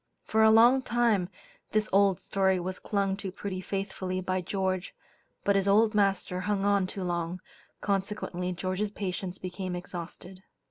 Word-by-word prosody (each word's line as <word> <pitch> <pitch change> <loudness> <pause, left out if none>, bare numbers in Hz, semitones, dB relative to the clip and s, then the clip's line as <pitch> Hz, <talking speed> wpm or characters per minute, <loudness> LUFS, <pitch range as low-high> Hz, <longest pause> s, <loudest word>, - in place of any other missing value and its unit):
For 220 - +1
a 220 - +7
long 235 +4 +6
time 235 -7 +1 0.4
this 215 0 +2
old 195 -2 +4
story 190 -1 +1
was 185 +1 -4
clung 200 -2 0
to 195 -2 -5
pretty 190 0 -5
faithfully 190 -1 -3
by 185 0 -1
George, 185 0 -2 0.5
but 200 - +3
his 195 0 +2
"old 215 +2 +4
master 195 -3 +1
hung 200 +1 0
on 200 -2 +3
too 190 0 -5
long," 175 0 -2 0.4
consequently 195 -2 -2
George's 185 +3 -2
patience 190 -2 -4
became 185 0 -5
exhausted. 180 +1 -8
190 Hz, 150 wpm, -29 LUFS, 185-205 Hz, 0.5 s, a